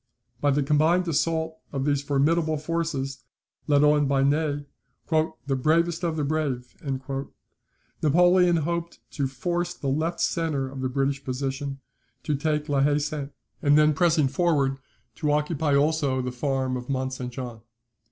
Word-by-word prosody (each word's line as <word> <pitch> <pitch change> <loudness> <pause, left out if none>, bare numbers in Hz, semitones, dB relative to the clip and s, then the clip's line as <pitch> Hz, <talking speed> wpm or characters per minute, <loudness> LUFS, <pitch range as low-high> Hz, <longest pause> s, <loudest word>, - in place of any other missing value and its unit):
By 145 - +2
the 145 +1 +2
combined 160 +5 +3
assault 160 0 0
of 135 -1 -2
these 145 -1 +1
formidable 155 +3 +1
forces, 145 -4 -3 0.4
led 145 -1 +4
on 150 -1 +4
by 135 0 +2
Ney, 145 0 +1 0.5
"the 145 -4 0
bravest 165 +5 +1
of 165 -2 0
the 155 - -1
brave," 140 -5 -2 1.3
Napoleon 175 +3 +5
hoped 170 +1 -2
to 140 -3 -1
force 175 +6 -2
the 140 - -3
left 160 +5 -1
centre 155 -5 0
of 130 0 -7
the 130 - -1
British 135 +1 -1
position, 135 +1 -3 0.4
to 150 - -1
take 150 +1 -1
La 140 -2 +1
Haye 145 +1 +3
Sainte, 150 -1 -3 0.3
and 145 +1 +4
then 150 0 +5
pressing 160 -2 +3
forward, 140 -2 +1 0.4
to 150 -2 0
occupy 150 0 +1
also 145 -2 +2
the 125 0 -2
farm 130 0 -1
of 125 0 -6
Mont 130 -1 -1
St. 125 -1 -5
Jean. 120 -2 -6
145 Hz, 150 wpm, -25 LUFS, 135-160 Hz, 1.3 s, Napoleon